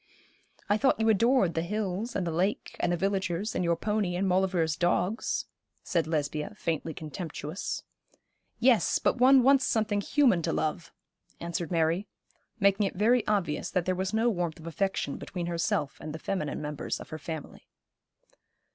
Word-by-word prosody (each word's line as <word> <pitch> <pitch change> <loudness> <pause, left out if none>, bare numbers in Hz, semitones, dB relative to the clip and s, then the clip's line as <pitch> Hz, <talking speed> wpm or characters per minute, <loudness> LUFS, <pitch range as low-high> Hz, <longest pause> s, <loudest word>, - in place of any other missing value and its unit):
'I 205 - +3
thought 265 -2 +3
you 225 0 +3
adored 220 -3 +3
the 165 - 0
hills, 210 +4 -3
and 190 - 0
the 170 - -1
lake, 185 +6 -1
and - - +1
the 175 - +1
villagers, 195 +1 -1
and 180 - -1
your 170 -1 +2
pony, 205 0 -1
and 190 +2 0
Maulevrier's 180 -4 +1
dogs,' 180 - 0 0.4
said, 165 -4 0
Lesbia 155 +5 -2
faintly 165 -4 -2
contemptuous. 160 +2 -5 0.7
'Yes, 240 -2 +4
but - - 0
one 260 +1 +7
wants 275 +1 +5
something 210 -2 +1
human 245 - +3
to - - -1
love,' 155 +1 -2 0.5
answered 170 0 -3
Mary, 170 +3 +1 0.5
making 200 0 +3
it - - -6
very 225 +4 +3
obvious 195 -8 0
that 180 -2 0
there 185 - +1
was 190 +1 -2
no 225 +2 +2
warmth 175 -8 -1
of 160 - -12
affection 190 +4 -2
between 180 -3 -5
herself 165 -4 -1
and 155 - -6
the - - -4
feminine 160 -3 -3
members 150 -1 -3
of - - -10
her 155 - -6
family. 160 -1 -7
185 Hz, 165 wpm, -29 LUFS, 165-210 Hz, 0.7 s, one